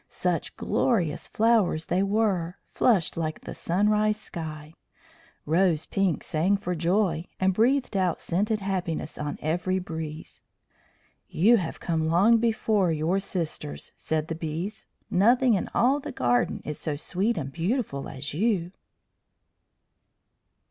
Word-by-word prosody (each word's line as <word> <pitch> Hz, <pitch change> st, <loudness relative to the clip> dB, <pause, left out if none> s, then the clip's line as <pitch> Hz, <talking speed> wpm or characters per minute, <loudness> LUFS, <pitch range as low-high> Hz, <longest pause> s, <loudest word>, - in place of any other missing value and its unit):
Such -, -, -2 dB
glorious 180 Hz, -, 0 dB
flowers 215 Hz, -8 st, +2 dB
they 180 Hz, -, +1 dB
were, 195 Hz, -4 st, 0 dB
flushed 195 Hz, -12 st, +2 dB
like 155 Hz, -1 st, -3 dB
the -, -, -7 dB
sunrise 210 Hz, +4 st, +1 dB
sky. 155 Hz, -6 st, -7 dB, 0.7 s
Rose 165 Hz, 0 st, +2 dB
Pink 195 Hz, -6 st, 0 dB
sang 180 Hz, +6 st, +1 dB
for 185 Hz, -3 st, -3 dB
joy, 175 Hz, 0 st, +1 dB
and 190 Hz, 0 st, +2 dB
breathed 245 Hz, +3 st, +2 dB
out 185 Hz, -3 st, +1 dB
scented 210 Hz, +5 st, -1 dB
happiness 180 Hz, -5 st, -3 dB
on 150 Hz, -1 st, -3 dB
every 175 Hz, +4 st, 0 dB
breeze. 160 Hz, -3 st, -6 dB, 0.9 s
"You 225 Hz, +8 st, +5 dB
have 170 Hz, -5 st, -4 dB
come 160 Hz, -2 st, -1 dB
long 200 Hz, +8 st, +5 dB
before 220 Hz, -5 st, +1 dB
your 160 Hz, +5 st, +1 dB
sisters," 160 Hz, -, -4 dB
said 155 Hz, -1 st, -2 dB
the 165 Hz, -, -3 dB
Bees. 165 Hz, +6 st, -5 dB, 0.2 s
"Nothing 240 Hz, +6 st, +4 dB
in 195 Hz, -, -1 dB
all 265 Hz, +4 st, +3 dB
the -, -, -6 dB
garden 120 Hz, -1 st, 0 dB
is 150 Hz, -, -5 dB
so 155 Hz, -, -2 dB
sweet 190 Hz, +9 st, -1 dB
and 140 Hz, -3 st, -3 dB
beautiful 170 Hz, -, -2 dB
as 135 Hz, +2 st, -6 dB
you." 180 Hz, -1 st, 0 dB
180 Hz, 130 wpm, -26 LUFS, 160-210 Hz, 0.9 s, You